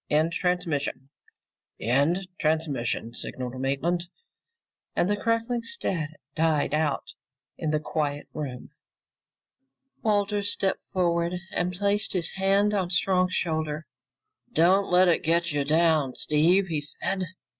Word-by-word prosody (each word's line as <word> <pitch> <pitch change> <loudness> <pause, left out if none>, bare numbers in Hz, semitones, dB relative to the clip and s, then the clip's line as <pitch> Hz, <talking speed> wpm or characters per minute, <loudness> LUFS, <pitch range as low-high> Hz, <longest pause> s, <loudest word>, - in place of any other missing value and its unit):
End 155 +3 +2
transmission." 160 -7 -1 0.7
"End 145 - +1
transmission!" 145 -7 -1
signaled 130 +1 -5
Maitland, 170 +6 0 0.9
and - - +2
the 205 - +2
crackling 230 +3 0
static 170 - -2
died 155 -3 +1
out 150 -2 0 0.4
in 160 - -3
the 155 0 +1
quiet 145 -2 -2
room. 135 -5 -6 1.3
Walters 205 -1 +1
stepped 190 -1 0
forward 170 -1 +1 0.2
and 175 +1 0
placed 200 +3 0
his 175 -4 0
hand 195 +2 +2
on 190 -4 0
Strong's 185 0 +2
shoulder. 155 -2 -1 0.7
"Don't 185 +5 +4
let 180 +1 +5
it 170 - +3
get 170 +1 +1
you 145 -1 0
down, 155 -3 +2
Steve," 170 +6 +3
he 160 -5 -2
said. 185 +6 -2
170 Hz, 120 wpm, -26 LUFS, 150-190 Hz, 1.3 s, let